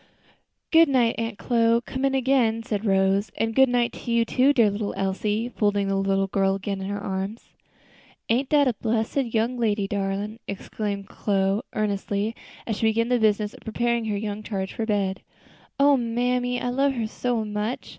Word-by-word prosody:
"Good 325 -1 +6
night, 245 -4 +3
Aunt 225 -2 -3
Chloe; 230 -1 +2
come 260 +1 -2
in 270 0 +1
again," 245 -4 +2
said 215 -2 -2
Rose. 195 +1 +2
"And 225 0 0
good 265 +2 +5
night 245 -1 +1
to 235 - -6
you, 235 0 +3
too, 260 +4 +3
dear 230 -7 +4
little 205 0 -3
Elsie," 205 +4 -1
folding 205 -4 0
the 195 - +1
little 195 0 +1
girl 195 0 +1
again 195 0 -4
in 190 - -4
her 205 0 -3
arms. 195 +3 -4 0.8
"Ain't 255 +4 +1
dat 290 -2 +4
a 250 - +2
bressed 220 0 -2
young 240 -1 0
lady, 210 -3 +1
darlin'!" 200 +2 -3
exclaimed 200 0 -4
Chloe, 195 0 0
earnestly, 205 +1 -1 0.3
as 220 -3 -2
she 225 - +2
began 230 +2 +1
the 250 -1 +2
business 210 -1 +1
of - - -13
preparing 235 +1 -1
her 210 -2 -1
young 205 0 -4
charge 195 -3 -4
for 225 - -3
bed. 195 -3 0 0.6
"O 285 0 +6
mammy, 245 +1 0
I 245 - -2
love 275 +2 +1
her 230 -2 -1
so 230 0 -2
much! 210 +3 -3
220 Hz, 185 wpm, -25 LUFS, 200-240 Hz, 0.8 s, Good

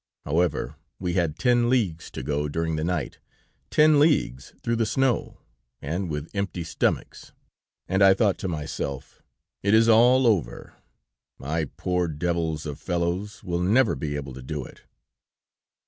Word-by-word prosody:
However, 85 +2 0 0.2
we 90 -2 -2
had 85 -4 0
ten 120 -2 +3
leagues 105 -11 0
to - - -7
go 75 +1 -1
during 80 +2 -1
the 75 - -2
night, 85 -5 -2 0.5
ten 150 -1 +5
leagues 140 - +1
through 115 0 0
the 115 - +1
snow, 130 +1 0 0.4
and 85 +6 -3
with 75 +1 -5
empty 100 -4 -3
stomachs, 85 - -2 0.5
and 95 +1 0
I 95 0 +7
thought 100 -2 +1
to - - -3
myself: 75 -4 -5 0.4
"'It 100 +2 +3
is 115 +1 +5
all 120 +3 +5
over; 85 - 0 0.6
my 80 +3 -2
poor 90 +4 -2
devils 80 0 -2
of 75 -2 -6
fellows 90 +4 -2
will 90 -2 -2
never 110 +7 +3
be 75 -3 -4
able 70 -2 -5
to 65 - -9
do 70 0 -5
it.' - - -14
85 Hz, 150 wpm, -25 LUFS, 75-110 Hz, 0.6 s, I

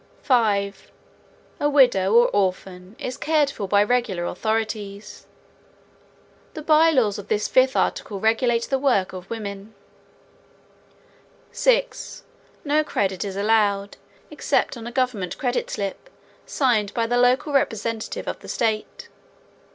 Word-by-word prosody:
5. 205 -6 0 0.7
A 290 - +1
widow 245 -8 +4
or 240 +1 +6
orphan 185 0 -2
is 255 +1 -5
cared 300 -1 +1
for 200 -6 -5
by 205 +1 +4
regular 210 -6 0
authorities. 215 0 -4 1.3
The 310 - -6
by 315 +1 +5
laws 230 -10 +1
of 205 - -9
this 210 0 0
fifth 260 +1 +3
article 200 -2 -1
regulate 230 +2 +1
the 270 +2 -1
work 245 -10 +1
of 185 0 -9
women. 205 -1 -7 1.8
6. - - 0 0.4
No 300 +1 +2
credit 195 -10 -1
is 195 -2 -5
allowed 205 -1 +1 0.3
except - - 0
on 235 -1 -8
a - - -6
government 240 -8 -2
credit 250 -1 -2
slip 200 - -5 0.4
signed 225 -7 +1
by 230 - +1
the 240 +1 0
local 250 +4 +2
representative 230 -4 -2
of - - -4
the - - -13
state. 225 - -2
225 Hz, 130 wpm, -23 LUFS, 200-255 Hz, 1.8 s, or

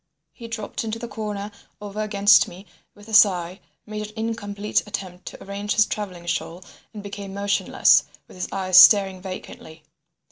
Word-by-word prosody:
He 235 - -10
dropped 225 -2 -5
into 220 0 -4
the 235 - -7
corner 210 -2 -5 0.3
over 210 +1 -6
against 205 0 +4
me 185 +3 -12 0.3
with 205 +1 -16
a 220 - -10
sigh, 185 -4 +4 0.3
made 210 0 -6
an 215 - -15
incomplete 210 -2 -2
attempt 185 -3 -7
to - - -9
arrange 200 +1 -4
his 215 - +5
travelling 185 -6 -6
shawl, 175 +1 -4 0.3
and 210 -2 -9
became 200 -1 -8
motionless, 200 0 +3 0.2
with - - -16
his 180 - -5
eyes 185 -1 +4
staring 195 -1 +6
vacantly. 165 -4 -10
205 Hz, 165 wpm, -23 LUFS, 190-215 Hz, 0.3 s, staring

